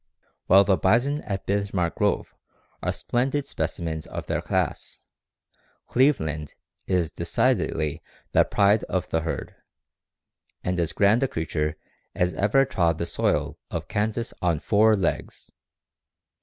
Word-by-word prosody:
"While 95 +2 +7
the 95 -1 +2
bison 130 +9 +2
at 95 -2 -4
Bismark 100 -4 0
Grove - - 0 0.5
are - - 0
splendid 135 +4 -1
specimens 80 - -3
of - - -6
their - - -1
class, - - -2 0.8
"Cleveland" 80 - +1 0.3
is 90 -4 +1
decidedly 75 -2 0 0.3
the - - +5
pride 100 +2 +3
of 95 - -2
the 80 - +1
herd, 80 0 -4 1.1
and 90 0 -1
as 85 -2 0
grand 105 +4 +3
a 135 - +2
creature 80 - -2 0.4
as 90 0 +1
ever 105 +11 +3
trod 85 - +1
the 85 - -2
soil - - -1
of - - -4
Kansas 110 +2 -2
on 85 -4 +1
four 110 +4 +4
legs. 95 -4 -3
95 Hz, 130 wpm, -25 LUFS, 80-110 Hz, 1.1 s, While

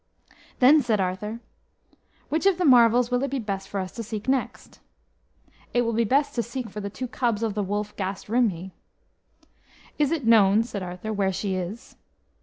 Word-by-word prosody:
Then 285 +4 +6
said 225 -5 0
Arthur, 195 +5 -3 0.9
"Which 320 +6 +1
of 385 -3 +3
the 365 - 0
marvels 240 -2 +5
will 245 0 +1
it 275 - -1
be 275 - -2
best 195 -4 -4
for 200 - -3
us 185 -1 -4
to 230 - -7
seek 215 0 -6
next?" 265 -1 -2 1.0
"It 245 - +4
will 230 0 -1
be 230 +1 +1
best 275 +6 +1
to 240 - 0
seek 235 -1 -6
for 210 - -6
the 200 - -4
two 255 +5 -5
cubs 235 -3 -1
of 220 -2 -1
the 210 - -1
wolf 205 +1 -3
Gast 190 0 -4
Rhymhi." 200 -6 0 1.3
"Is 295 -1 +2
it 315 -7 -1
known," 215 -2 +5
said 220 -4 -6
Arthur, 180 +4 -5
"where 195 -2 +1
she 190 +1 -3
is?" 185 +5 -6
220 Hz, 190 wpm, -25 LUFS, 200-245 Hz, 1.3 s, Then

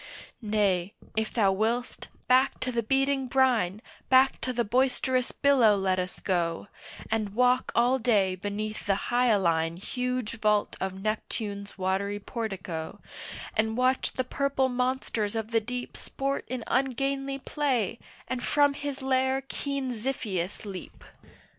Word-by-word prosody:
Nay 205 -4 +1 0.2
if 220 0 0
thou 205 -5 +3
will'st, 225 +5 -1 0.2
back 255 +1 +4
to 255 - -1
the 235 -1 0
beating 270 +3 +1
brine, 240 -7 +2 0.3
Back 260 +1 +5
to 255 - -1
the 240 -1 0
boisterous 255 +2 +1
billow 255 -7 +4
let 190 -1 +1
us 180 0 -4
go, 175 0 -1 0.4
And 215 -2 -1
walk 250 +1 +3
all 245 +3 +4
day 210 -6 +3
beneath 205 +3 -4
the 195 - +3 0.2
hyaline 180 -9 +2
Huge 250 +2 -3
vault 210 -1 +2
of 190 0 -3
Neptune's 210 -2 -3
watery 195 +2 0
portico, 195 -7 -5 0.6
And 220 +1 +1
watch 255 +1 +2
the 255 - -1
purple 270 0 0
monsters 250 -4 -1
of 220 0 -3
the 225 -1 +3
deep 245 +3 -5
Sport 275 +1 -3
in 255 -2 -4
ungainly 275 +2 0
play, 260 - -1 0.3
and 255 -1 -3
from 290 +1 +3
his 280 -1 -5
lair 265 0 +2
keen 275 -3 -2
Xiphias 215 -6 -3
leap. 190 -3 -8
235 Hz, 135 wpm, -28 LUFS, 205-260 Hz, 0.6 s, Back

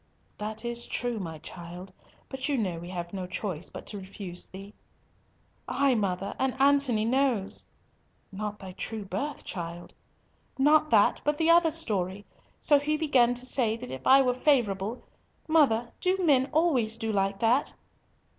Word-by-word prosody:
"That 215 +2 -5
is 235 0 -3
true, 240 -2 -2
my 165 -4 -6
child, 175 +3 -10 0.3
but 265 +1 -4
you 285 - +1
know 185 -7 -2
we 175 +1 -9
have 175 -1 -6
no 185 -2 -4
choice 180 -2 -4
but - - -9
to 205 - -6
refuse 190 -2 -6
thee." 195 +2 -10 0.9
"Ay, 280 -2 +2
mother, 195 -3 -1
and 265 0 -1
Antony 275 -5 +3
knows." 245 -5 0 0.6
"Not 210 +1 -5
thy 190 -2 -9
true 210 +3 -5
birth, 285 +9 -4
child?" 170 -1 -7 0.6
"Not 305 +3 +4
that, - - +4
but 295 0 0
the 325 +1 +4
other 335 -1 +5
story. 205 - 0 0.3
So 290 -1 +4
he 305 +2 0
began 255 -6 +3
to 245 +1 -4
say 235 -4 +1
that 125 - -8
if 130 0 -6
I 270 +1 +7
were 250 -1 +2
favourable—Mother, 240 +2 0
do 370 +1 +1
men 285 -7 +3
always 265 -9 +2
do 225 -1 -2
like 195 -1 0
that?" 240 +5 +2
225 Hz, 155 wpm, -28 LUFS, 195-275 Hz, 0.9 s, I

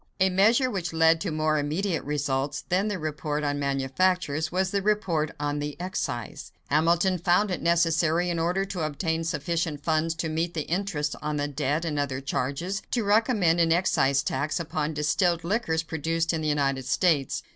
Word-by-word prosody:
A 190 0 +3
measure 225 +8 +4
which 175 -5 -3
led 165 0 +4
to 195 - -2
more 155 -1 +1
immediate 160 +4 -1
results 145 -1 -2
than 190 +4 +2
the 205 -2 -2
report 150 -2 -3
on 145 0 -1
manufactures 145 +3 0
was 190 +1 0
the 200 - 0
report 190 -7 0
on 145 0 -1
the 145 0 -5
excise. 175 -10 -4 0.2
Hamilton 170 +4 +3
found 180 +4 +2
it 180 - -2
necessary, 170 0 +2
in 170 - -2
order 180 +4 0
to 190 -3 -5
obtain 160 +2 -1
sufficient 165 -1 -2
funds 160 0 +1
to 165 - -3
meet 165 +2 -2
the 160 - 0
interest 170 -5 -1
on 150 0 -2
the 145 0 -1
debt 145 +3 -1
and 150 -3 -1
other 135 -2 -1
charges, 140 +8 -2
to 240 - 0
recommend 205 -5 +3
an 165 -1 +3
excise 140 -6 +2
tax 155 +5 -1
upon 155 -2 -3
distilled 165 +3 +1
liquors 170 -4 0
produced 165 +1 -1
in 160 - -1
the 155 - -2
United 135 -3 0
States. 145 -3 +1
160 Hz, 180 wpm, -26 LUFS, 150-180 Hz, 0.2 s, measure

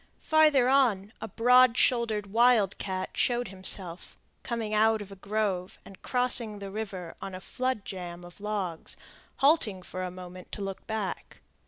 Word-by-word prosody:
Farther 305 -5 +4
on, 230 -7 +2
a - - -4
broad 250 +3 +5
shouldered 230 -4 +2
wildcat 200 -4 +2
showed 245 0 0
himself, 185 -2 -2 0.2
coming 230 -3 -3
out 220 +1 +4
of 200 -1 -9
a - - -8
grove, 195 -2 -2
and 195 - -14
crossing 245 -4 +1
the 200 -1 -7
river 195 -5 -5
on 190 - -6
a - - -6
flood 255 +1 -3
jamb 175 -2 -7
of 175 +3 -14
logs, 200 -6 -3 0.4
halting 260 - +2
for 185 - -6
a 185 - -3
moment 180 0 -10
to 205 - -4
look 195 -1 -6
back. 220 -3 -4
210 Hz, 155 wpm, -28 LUFS, 185-235 Hz, 0.4 s, broad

